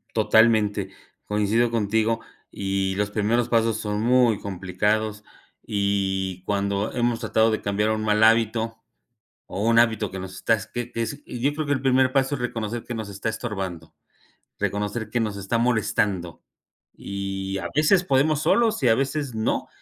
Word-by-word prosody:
Totalmente, 110 -2 +3 0.3
coincido 105 +3 +1
contigo 110 +1 +1 0.3
y 95 -1 -2
los 105 +1 -1
primeros 110 +3 +1
pasos 115 -2 +2
son 105 0 -2
muy 120 -2 +3
complicados 105 +3 -2 0.4
y 95 -2 -1
cuando 100 +1 -1
hemos 120 -2 0
tratado 110 0 +2
de 110 - -1
cambiar 105 +1 0
un 110 0 -1
mal 105 0 +2
hábito 115 0 +3 0.6
o 95 +3 -5
un 115 - +4
hábito 110 -4 +2
que 95 - -6
nos 95 0 -7
está 115 - +2
es 105 -3 -4
que 120 0 -6
ese 115 +6 -3
y 120 - -7
yo 140 +4 +2
creo 155 0 -3
que 145 - +2
el 130 - -3
primer 130 -1 +3
paso 135 +1 +2
es - - -9
reconocer 115 -1 -3
que 120 - -6
nos 110 -3 -5
está 100 +3 -4
estorbando, 95 -7 -5 0.7
reconocer 105 +2 -2
que 120 - -1
nos 110 -3 -1
está 100 +3 -2
molestando 105 -7 0 0.5
y 95 0 -4
a 90 -2 -4
veces 165 +5 +4
podemos 150 0 +2
solos 225 -8 +2
y 125 - +4
a 115 - +6
veces 135 +1 -1
no, 110 0 -1
110 Hz, 165 wpm, -24 LUFS, 100-120 Hz, 0.7 s, a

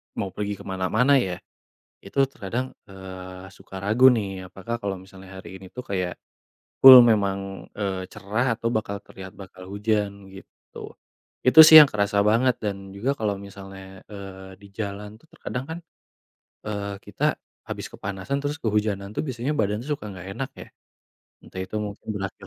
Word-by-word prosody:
mau 95 -2 -3
pergi 105 0 -3
kemana-mana 100 +8 +1
ya, 95 -7 -2 0.7
itu 100 +8 -9
terkadang, 120 +3 -4 0.2
eee, 95 -1 -10
suka 95 0 -11
ragu 110 +6 +4
nih. 95 -4 -4
Apakah 95 +6 -6
kalau 100 -2 -3
misalnya 95 0 -13
hari 95 - -10
ini 95 - -12
tuh 125 - -6
kayak, 90 -3 -2 0.6
full 130 -2 +11
memang, 100 -4 0
eee, 95 -3 -3
cerah 115 +5 -1
atau 115 +1 -2
bakal 105 -3 -3
terlihat 95 -1 -11
bakal 95 -1 -12
hujan, 100 -1 -2
gitu. 95 - -13 0.5
Itu 130 +5 +3
sih 160 -1 +12
yang 145 - +4
kerasa 100 -1 +1
banget, 115 +5 +3
dan 100 -2 -5
juga 110 +7 -1
kalau 105 -2 0
misalnya, 95 -1 -11
eee, 95 -2 -10
di - - -12
jalan 105 0 -6
tuh - - -25
terkadang 125 +1 -5
kan, 160 +3 -6 0.9
eee, 100 -1 -4
kita, - - -1 0.3
habis - - -5
kepanasan 100 +8 -4
terus 145 +1 -2
kehujanan 105 -3 -1
tuh - - 0
biasanya 130 0 -3
badan 105 -2 0
suka 140 -8 -4
nggak 95 -1 -10
enak 135 - -4
ya, - - -9 0.7
entah 95 - -9
itu 110 - -7
mungkin 105 -1 -7
berakhir 95 -1 -6
100 Hz, 160 wpm, -24 LUFS, 95-110 Hz, 0.9 s, sih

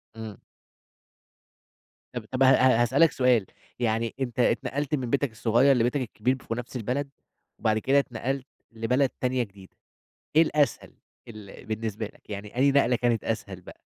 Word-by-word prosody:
امم. 110 -2 -8 1.8
طب 120 -3 -5
طب، 130 +1 +2
ه - - +7
ه 130 -2 +5
هاسألك 140 +6 +4
سؤال، 125 -6 +3 0.3
يعني 115 -1 0
أنت 125 -2 -3
اتنقلت 145 +4 +1
من 125 -4 -4
بيتك 140 -2 0
الصغيّر 120 +5 +3
لبيتك 125 +3 +1
الكبير 125 +2 -1
في 115 - -5
نفس 125 +1 -7
البلد، 130 +4 -2 0.5
وبعد 110 0 +1
كده 135 +5 +3
اتنقلت 130 +1 -3 0.3
لبلد 125 +4 +1
تانية 125 -1 +1
جديدة. 100 -3 -15 0.6
إيه 160 - +8
الأسهل 150 -4 0 0.4
ال 105 -3 -11
بالنسبة 110 -1 -3
لك 105 - -17
يعني 105 +3 -7
أي 140 +2 +4
نقلة 125 -3 +3
كانت 120 -2 0
أسهل 100 -4 -4
بقى؟ - - -14
120 Hz, 150 wpm, -26 LUFS, 110-135 Hz, 1.8 s, إيه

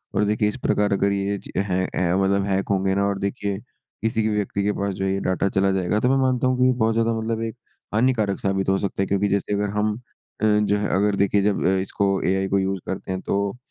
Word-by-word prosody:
और 105 - +3
देखिए 105 0 +1
इस 105 - -6
प्रकार 105 -1 +2
अगर 100 0 +2
ये 100 0 -1
ची - - -12
है 95 -1 0
है 90 0 +1
मतलब 100 0 +2
हैक 95 -1 -1
होंगे 95 -1 +1
ना 100 - +1
और 100 -1 -1
देखिए 100 0 -2 0.5
किसी 110 -1 +1
भी 105 - 0
व्यक्ति 100 -1 -1
के 105 - +2
पास 100 0 -1
जो 95 - -2
है 95 - +1
ये 95 - -1
डेटा 95 +1 0
चला 95 0 +2
जाएगा। 95 +2 0
तो 125 - +2
मैं 135 - +3
मानता 130 -1 +2
हूँ 130 0 +1
कि 130 0 +5
बहुत 110 0 +2
ज़्यादा 115 0 +1
मतलब 110 0 -2
एक 115 0 -4 0.4
हानिकारक 110 -3 +1
साबित 95 -1 0
हो 95 - +3
सकता 100 0 -2
है 95 - 0
क्योंकि 100 +1 +1
जैसे 100 +1 0
अगर 105 0 0
हम 105 0 +1 0.5
अ, - - +2
जो 105 -1 +3
है 105 -1 -1
अगर 100 +1 +2
देखिए 100 +1 +2
जब 105 -3 +1
अ 95 +1 +3
इसको 100 0 0
एआई 95 +1 +1
को 100 0 +1
यूज़ 95 0 -1
करते 95 0 -5
हैं 95 - -3
तो 100 +2 -1
100 Hz, 255 wpm, -23 LUFS, 95-105 Hz, 0.5 s, कि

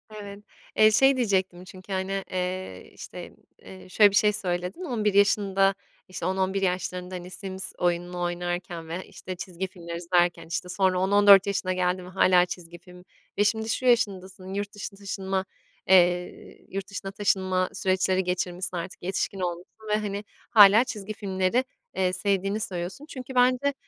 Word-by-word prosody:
Evet. 200 -1 -8 0.4
Eee, 215 0 +7
şey 270 +5 +5
diyecektim 190 -6 0
çünkü, 185 +1 -10
hani, 190 +1 -2
eee, 185 - -4
işte, - - -9 0.3
eee, 185 0 -13
şöyle 205 +2 +6
bir - - -2
şey 210 +1 +4
söyledin. 180 - -3
11 220 - 0
yaşında, 195 -1 +3 0.3
işte, 185 -2 -6
10-11 190 +1 0
yaşlarında, 180 0 -2
hani, 180 0 -7
Sims 190 0 -6
oyununu 175 0 -1
oynarken 175 -1 -3
ve, 175 +3 -5
işte, 185 - -8
çizgi 180 +1 -5
filmler 170 -3 -8
izlerken, 175 0 +1
işte, 180 +2 -4
sonra 185 0 +1
10-14 200 +1 +6
yaşına 190 -2 -1
geldi 185 0 0
mi 180 - -10
hâlâ 185 -1 +4
çizgi 175 -1 -8
film 180 0 -15 0.3
ve 205 - +4
şimdi, 220 +1 0
şu 255 - -2
yaşındasın, 190 -6 0
yurt 200 +1 -4
dışına 200 -1 -7
taşınma, 195 -1 -3 0.4
eee, 180 -1 +2
yurt 195 0 -5
dışına 200 -1 -6
taşınma 190 -2 0
süreçleri 190 0 +1
geçirmişsin 180 0 -3
artık 175 +2 -7
yetişkin 190 +1 -2
olmuşsun 180 +5 -6
ve, 210 - +3
hani, 205 -1 -4 0.3
hâlâ 210 +1 +8
çizgi 215 -4 -6
filmleri, 195 +3 0 0.3
eee, 185 -1 +1
sevdiğini 200 +1 0
söylüyorsun. 185 +7 -5
Çünkü 260 0 -8
bence, 255 +3 +3
190 Hz, 155 wpm, -26 LUFS, 180-200 Hz, 0.4 s, hâlâ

